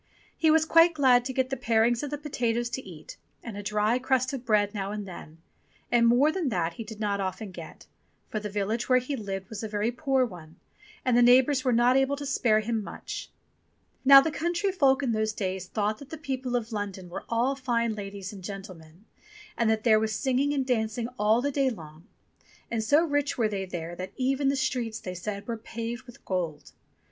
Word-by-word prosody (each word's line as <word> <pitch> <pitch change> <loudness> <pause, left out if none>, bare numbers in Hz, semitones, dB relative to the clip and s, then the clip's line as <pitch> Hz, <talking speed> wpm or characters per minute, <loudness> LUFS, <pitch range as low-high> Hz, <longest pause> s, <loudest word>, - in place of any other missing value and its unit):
He 320 - +2
was 315 0 +4
quite 330 +1 +5
glad 255 -4 +4
to 265 - -2
get 260 0 -1
the - - 0
parings 235 -2 +2
of 290 - -4
the 295 - -3
potatoes 240 -5 -2
to 260 - -3
eat 165 -5 -11 0.3
and 230 -4 -7
a 205 - -5
dry 210 +3 +1
crust 260 +1 +1
of 260 -3 -4
bread 210 -3 +2
now 200 -1 -3
and 210 -1 -5
then, 165 -3 -10 0.5
and 235 -1 +5
more 255 +6 +4
than 340 -5 -1
that 170 -6 -1
he 225 - -6
did 220 -1 -10
not 205 -2 -1
often 195 +2 -4
get, - - -10 0.4
for 215 - -3
the 210 0 -5
village 210 +4 -2
where 255 - +6
he 255 +3 -2
lived 195 -5 -5
was 220 - -6
a 220 - -3
very 210 +2 -1
poor 265 0 +1
one 170 -7 -11 0.5
and 250 -2 +3
the 245 - +5
neighbours 255 +2 +5
were 255 - +2
not 240 +2 +4
able 270 +1 +2
to 285 0 -7
spare 225 -5 +2
him 225 0 -2
much. - - -7 0.7
Now 275 0 +10
the 320 - -1
country 345 +5 -1
folk 280 -6 +3
in 250 - +1
those 215 -1 0
days 190 -2 -3
thought 210 +1 -1
that 280 - -12
the 320 - -7
people 265 -4 -3
of 235 -1 -2
London 200 -3 -4
were 175 - -7
all 240 +4 +1
fine 235 -4 0
ladies 200 -1 -7
and 195 -2 -10
gentlemen, 185 -2 -9 0.5
and 230 -2 +1
that 220 -1 +1
there 220 -3 +5
was 215 -1 -1
singing 265 +3 +1
and 275 -2 0
dancing 230 -1 -1
all 220 +4 +3
the 285 - 0
day 275 -1 +2
long, 160 -5 -10 0.6
and 225 -1 -1
so 295 +9 +4
rich 290 -2 0
were 230 -3 +2
they 195 -2 -3
there 175 -2 -6
that 185 +1 -6
even 270 +2 +1
the 275 - +1
streets, 240 -4 -2
they 185 - -6
said, 200 +4 -5
were 230 -1 -3
paved 230 +2 -6
with 245 - -15
gold. 175 -5 -3
230 Hz, 215 wpm, -27 LUFS, 205-265 Hz, 0.7 s, Now